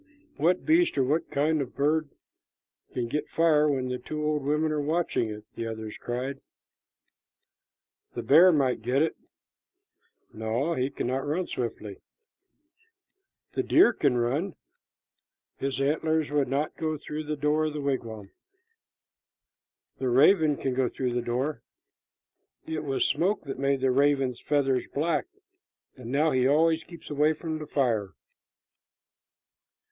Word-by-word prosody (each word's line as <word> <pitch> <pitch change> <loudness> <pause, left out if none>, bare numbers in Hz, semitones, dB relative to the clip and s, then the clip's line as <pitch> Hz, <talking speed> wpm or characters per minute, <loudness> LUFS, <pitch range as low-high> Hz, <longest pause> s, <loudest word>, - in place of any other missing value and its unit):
"What 180 +2 +1
beast 335 - +3
or 135 - +4
what 150 +6 0
bird 150 +1 0 0.8
can 120 -2 -2
get 150 +6 -3
fire 155 -2 +3
when 130 -3 -1
the 125 0 -3
two 150 +4 -5
old 150 -1 0
women 150 +2 +1
are 150 -1 0
watching 155 -6 0
it?" 105 0 -7
the 115 - -4
others 110 -1 -6
cried. 130 +3 -4 1.7
"The - - -4
bear 170 +6 +7
might 135 -7 +1
get 125 +6 +2
it." 160 - -1 1.2
"No, 120 +9 -1
he 130 -3 -1
cannot 130 +1 -3
run 170 +5 -1
swiftly." 110 - -5 1.6
"The - - 0
deer 310 -7 +5
can 140 - +1
run." 140 +11 -1 1.0
"His 135 -1 -3
antlers 155 +2 0
would 145 -2 +1
not 140 +4 -1
go 155 -1 -2
through 150 +1 -6
the 150 0 -2
door 150 +2 +1
of 155 - -2
the 150 - -4
wigwam." 115 -7 -3 1.7
"The 130 - 0
raven 150 +3 +5
can 135 - -2
go 125 -1 +1
through 125 -2 -2
the 120 - 0
door." 125 +2 -2 1.0
"It 160 -1 -4
was 135 -2 0
smoke 180 +8 0
that 135 -3 -6
made 140 -1 +1
the 130 -1 +3
raven's 135 -2 +2
feathers 135 -3 +1
black, 165 - 0 0.7
and 125 -2 -8
now 150 +3 +2
he 130 0 +2
always 160 +3 +3
keeps 170 -3 -12
away 150 +2 +3
from 160 0 -5
the 150 - -7
fire." 115 -8 0
145 Hz, 140 wpm, -27 LUFS, 125-155 Hz, 1.7 s, bear